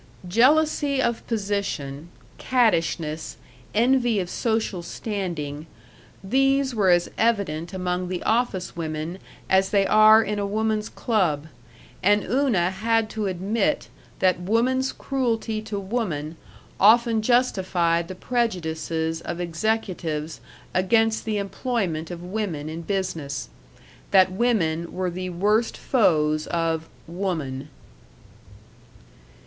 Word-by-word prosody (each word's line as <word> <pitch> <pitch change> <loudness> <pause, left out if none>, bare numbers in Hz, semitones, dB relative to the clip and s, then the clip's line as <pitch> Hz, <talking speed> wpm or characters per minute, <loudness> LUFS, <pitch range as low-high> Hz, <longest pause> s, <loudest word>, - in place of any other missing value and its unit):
Jealousy 280 - +3
of 235 -3 -1
position, 195 - -3 0.3
cattishness, 165 -10 0 0.4
envy 240 -1 +3
of 180 -1 -3
social 220 -5 -1
standing 170 -6 -4 0.6
these 270 +5 +2
were 205 -4 +2
as 175 -1 +4
evident 200 -8 0
among 180 -1 -2
the 180 0 -4
office 220 -5 0
women 160 +2 -4 0.3
as 190 0 +3
they 200 -1 +3
are 215 +2 +7
in 210 -1 -2
a 200 - -1
woman's 215 +1 -1
club; 175 -11 0 0.6
and 205 +1 +3
Una 220 -7 +1
had 225 +3 0
to 215 -2 -2
admit 195 +4 -1 0.3
that 185 -2 +2
woman's 245 +8 +1
cruelty 230 -5 -2
to 215 -2 -4
woman 190 -8 -3 0.4
often 225 +2 +5
justified 185 -8 +1
the 185 - -7
prejudices 165 -8 -2
of 170 +1 -5
executives 170 -4 -2 0.3
against 220 +4 +2
the 215 -1 -1
employment 195 -5 -2
of 175 -1 -7
women 180 -6 -3
in 160 +1 -5
business; 165 - -3 0.6
that 190 -1 +5
women 180 -7 0
were 185 -1 -2
the 185 +1 -4
worst 210 +6 +1
foes 155 - +2
of 165 -1 -1 0.2
Woman. 160 -6 -4
190 Hz, 110 wpm, -24 LUFS, 170-225 Hz, 0.6 s, are